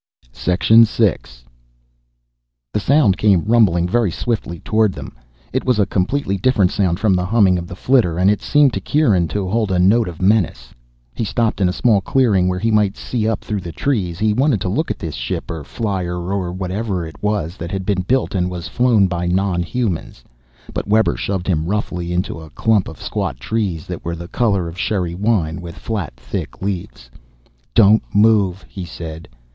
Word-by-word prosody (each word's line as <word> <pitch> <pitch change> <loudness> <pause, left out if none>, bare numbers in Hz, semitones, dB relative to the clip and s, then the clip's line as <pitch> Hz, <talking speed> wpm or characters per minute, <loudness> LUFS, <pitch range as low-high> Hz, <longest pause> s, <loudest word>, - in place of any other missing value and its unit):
6. 90 - -1 2.0
The - - +1
sound 125 -4 +3
came 100 -5 +3
rumbling 100 -7 +3
very 115 +2 +1
swiftly 85 -3 -3
toward 110 -3 +1
them. - - -9 0.4
It - - 0
was 125 -3 +1
a 105 - +3
completely 100 +2 -1
different 100 -4 +2
sound 90 -4 0
from 105 -4 +2
the 90 -1 0
humming 100 -4 +3
of 85 - -7
the 90 - -8
flitter, 110 -7 +2
and 90 +2 +3
it 105 +1 +2
seemed 145 -3 +3
to - - -3
Kieran 105 - +2
to 100 +2 -3
hold 105 +1 0
a 90 - +1
note 105 +6 +4
of 85 -2 -8
menace. 95 - +1 0.4
He - - -3
stopped 110 0 -1
in 90 - +3
a - - 0
small 105 +1 +2
clearing 105 -6 +2
where 90 0 0
he 115 +4 0
might 105 -2 +2
see 115 -3 -2
up 110 - -2
through 105 -2 -3
the 85 - -7
trees. 95 -8 -1
He 105 +1 +1
wanted 130 -2 +1
a 90 - -1
look 150 - -1
at - - -2
this 80 -3 -5
ship - - -4
or 80 -2 -5
flier 95 - -3
or 90 0 -3
whatever 95 0 -3
it 80 -3 -11
was 105 -5 -1
that 85 - -6
had 95 -1 -3
been 100 -2 0
built 130 +8 0
and 90 -2 0
was 90 -2 -6
flown 120 -5 +3
by 90 -1 -2
non 90 0 +1
humans. 90 - -3 0.5
But - - -3
Webber 110 +2 +3
shoved 95 -3 -3
him 80 -3 0
roughly 90 -3 -2
on 90 - -3
into 90 -1 -2
a 80 - -11
clump 110 +3 +1
of 80 - -10
squat - - -3
trees 100 -8 -2
that - - -7
were 85 0 -3
the 85 +1 -8
color 100 -7 0
of 85 +2 -8
sherry 90 -5 -1
wine, 90 -4 0
with 85 -1 -9
flat 100 - -4
thick - - -6
leaves. 90 -10 -5 0.6
"Don't 110 0 +6
move," 100 -3 +3
he 95 - -7
said. 80 -1 -8
95 Hz, 195 wpm, -19 LUFS, 90-110 Hz, 2.0 s, Don't